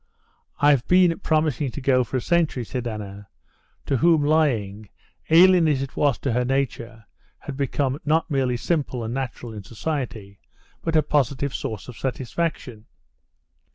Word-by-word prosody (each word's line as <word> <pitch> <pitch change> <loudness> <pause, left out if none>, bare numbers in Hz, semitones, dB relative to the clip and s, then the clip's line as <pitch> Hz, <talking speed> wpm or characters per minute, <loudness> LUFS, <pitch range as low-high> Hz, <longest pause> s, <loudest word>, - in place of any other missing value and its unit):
I've 140 -3 +3
been 180 -2 +4
promising 155 -6 0
to 135 - -7
go 130 -1 +2
for 130 - -3
a - - -2
century," 160 -8 0
said 125 +1 -4
Anna, 100 -2 -7 0.6
to 135 - 0
whom 160 +3 +4
lying, 115 -10 0 0.4
alien 175 0 +6
as 140 -3 +1
it 135 - -8
was 145 -3 +2
to 135 - -1
her 125 +1 +1
nature, 120 -4 -3 0.3
had 140 - -8
become 140 0 -1
not 160 +2 +1
merely 130 -3 +1
simple 135 -3 -2
and 115 +1 -4
natural 125 -3 -5
in 105 - -7
society, 110 - -5 0.4
but 165 -1 -2
a 155 - +4
positive 140 -1 0
source 110 -3 -5
of 120 -4 -10
satisfaction. 130 -3 -4
135 Hz, 155 wpm, -23 LUFS, 120-150 Hz, 0.6 s, alien